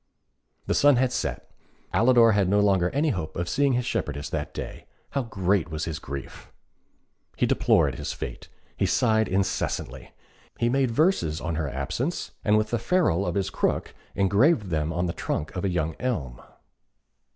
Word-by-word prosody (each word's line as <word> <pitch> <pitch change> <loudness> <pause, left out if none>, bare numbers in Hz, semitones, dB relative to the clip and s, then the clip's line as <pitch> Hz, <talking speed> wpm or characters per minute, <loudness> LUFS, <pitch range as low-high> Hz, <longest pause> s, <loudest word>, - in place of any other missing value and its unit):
The - - 0
sun 145 -1 +5
had 125 0 +2
set. - - -3 0.4
Alidor 115 +2 +5
had 100 -3 +2
no 100 +1 +3
longer 95 -3 +3
any 150 +3 +1
hope 80 - -3
of 85 0 -2
seeing 140 +9 +2
his 125 0 0
shepherdess 75 - -3
that 75 -2 -3
day. - - -7 0.2
How 140 - 0
great 95 -6 0
was 80 0 -3
his 80 -2 -4
grief! 70 -2 -8 0.9
He - - +2
deplored - - +3
his - - -3
fate. - - -7 0.3
He - - +1
sighed 110 0 +2
incessantly. 95 0 -2 0.5
He 120 - +1
made 135 0 +2
verses 115 - +1
on 85 +1 -3
her 80 -2 -2
absence, 85 - -3
and 105 0 +4
with 110 0 0
the 120 - +1
ferrule 115 - +1
of - - -2
his 95 -1 -1
crook - - -1 0.2
engraved 100 - +3
them 80 0 0
on 85 +2 -1
the 85 - -2
trunk 75 -2 -3
of 90 - -3
a 100 - +1
young 80 -3 -1
elm. 75 - -3
95 Hz, 175 wpm, -26 LUFS, 80-120 Hz, 0.9 s, sun